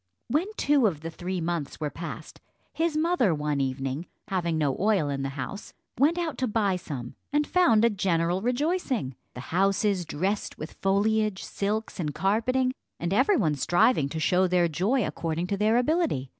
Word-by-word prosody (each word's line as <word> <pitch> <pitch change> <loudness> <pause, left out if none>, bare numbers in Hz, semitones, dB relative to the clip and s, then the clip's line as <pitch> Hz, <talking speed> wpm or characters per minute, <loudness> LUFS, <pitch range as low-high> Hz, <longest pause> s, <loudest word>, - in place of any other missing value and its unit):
When 305 +10 +1
two 280 -5 +4
of 160 -7 -3
the 165 +1 -5
three 180 +2 -4
months 165 -3 -3
were 150 -2 -2
passed, 170 - -8 0.3
his 325 -1 0
mother 310 - +2
one 150 -1 -1
evening, 135 +4 -3 0.2
having 170 -4 0
no 145 -4 +1
oil 200 -7 +2
in 140 -1 -2
the 135 - -2
house, 200 +10 -6 0.2
went 305 +6 +4
out 335 -4 -2
to 260 - +1
buy 210 -4 +1
some, 135 -9 -6 0.2
and 295 +1 +2
found 235 -13 +4
a - - +5
general 180 -2 0
rejoicing 250 - -1 0.2
the - - -6
houses 195 +1 +2
dressed 190 +6 -2
with 155 - -7
foliage, 210 +1 +1
silks, 210 +1 -3
and 150 -4 -2
carpeting, 255 +6 +1 0.3
and 170 +2 -1
every 265 - +4
one 155 - +2
striving 165 - +2
to 160 - -4
show 180 +3 +3
their 180 -1 +3
joy 195 - +1
according 165 +1 -2
to 200 +2 -2
their 215 +3 +3
ability. 280 - +1
195 Hz, 175 wpm, -27 LUFS, 160-240 Hz, 0.3 s, a